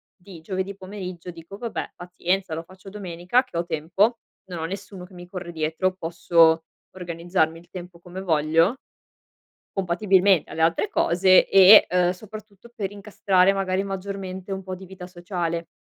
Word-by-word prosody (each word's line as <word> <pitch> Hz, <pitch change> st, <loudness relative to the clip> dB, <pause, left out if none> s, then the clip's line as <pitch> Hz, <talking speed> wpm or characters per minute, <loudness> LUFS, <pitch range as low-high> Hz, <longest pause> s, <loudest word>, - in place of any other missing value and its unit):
di 180 Hz, -3 st, -14 dB
giovedì 190 Hz, +3 st, -4 dB
pomeriggio, 185 Hz, -2 st, -8 dB
dico: 170 Hz, +3 st, -11 dB
vabbè 230 Hz, +1 st, -5 dB
pazienza 180 Hz, 0 st, -2 dB
lo 165 Hz, -, -5 dB
faccio 185 Hz, +3 st, -14 dB
domenica, 190 Hz, +3 st, -1 dB
che 250 Hz, -9 st, -8 dB
ho 170 Hz, -, -1 dB
tempo, 185 Hz, +8 st, 0 dB, 0.3 s
non 180 Hz, -3 st, -7 dB
ho 160 Hz, -, -3 dB
nessuno 190 Hz, +1 st, -7 dB
che 180 Hz, -, -19 dB
mi 175 Hz, 0 st, -11 dB
corre 180 Hz, -2 st, -7 dB
dietro, 160 Hz, +3 st, -1 dB
posso 165 Hz, -1 st, +3 dB, 0.3 s
organizzarmi 170 Hz, -2 st, -1 dB
il 170 Hz, -, -21 dB
tempo 175 Hz, -1 st, -10 dB
come 180 Hz, +2 st, -9 dB
voglio. 165 Hz, -, +2 dB, 1.0 s
Compatibilmente 190 Hz, 0 st, +2 dB
alle 160 Hz, -, -4 dB
altre 165 Hz, 0 st, +1 dB
cose 185 Hz, +2 st, +4 dB
e, 195 Hz, +2 st, +8 dB
uhm, 180 Hz, 0 st, +2 dB
soprattutto, 215 Hz, +2 st, -12 dB
per 195 Hz, -2 st, -3 dB
incastrare 195 Hz, -2 st, +2 dB
magari 190 Hz, -1 st, -1 dB
maggiormente 195 Hz, -1 st, -6 dB
un 190 Hz, 0 st, -4 dB
po' 185 Hz, 0 st, -6 dB
di 190 Hz, +1 st, -11 dB
vita 180 Hz, -1 st, -10 dB
sociale. 175 Hz, -2 st, -4 dB
185 Hz, 155 wpm, -24 LUFS, 170-195 Hz, 1.0 s, e